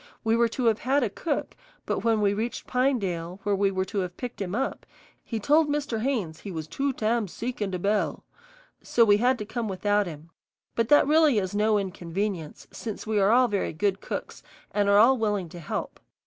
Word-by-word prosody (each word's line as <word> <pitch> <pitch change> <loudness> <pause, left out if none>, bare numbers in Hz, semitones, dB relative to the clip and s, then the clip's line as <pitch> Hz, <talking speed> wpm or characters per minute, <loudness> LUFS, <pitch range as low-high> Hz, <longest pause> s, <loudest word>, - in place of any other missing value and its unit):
We 225 0 +2
were 235 0 +4
to 245 +2 -3
have 225 -1 +3
had 275 +2 +2
a 215 - -1
cook, 300 +5 -3 0.3
but - - -1
when 225 -2 +1
we 200 -1 +3
reached 225 +4 -3
Pinedale, 195 -9 -1
where 205 0 +1
we 200 0 +2
were 190 -1 -1
to 200 +2 -3
have 180 -2 -4
picked 245 -4 -6
him 190 0 -3
up, 270 +3 -2 0.4
he 225 - -4
told 295 +7 +3
Mr. 290 -6 -1
Haynes 220 - -2
he 205 - -8
was 160 -3 -4
"too 275 - -1
tam 225 -2 0
seek 235 +6 -5
in 205 - 0
de 185 - -2
bel," 205 +4 0 0.6
so 235 - +3
we 205 -1 +5
had 250 +4 +2
to 210 - -5
come 225 +1 -3
without 205 +1 +1
him; 160 0 -9 0.4
but 230 -1 0
that 295 - +7
is - - -3
really 305 -6 +5
no 210 +1 +3
inconvenience, 185 -3 -4
since 220 -3 -6
we 215 -1 +1
are 195 0 +4
all 250 +3 +5
very 205 -4 -1
good 195 +4 0
cooks - - -6 0.3
and 205 -1 +1
are 200 - +6
all 245 +4 +6
willing 205 -5 -1
to 175 - -10
help. 160 - -5
210 Hz, 215 wpm, -26 LUFS, 195-240 Hz, 0.6 s, that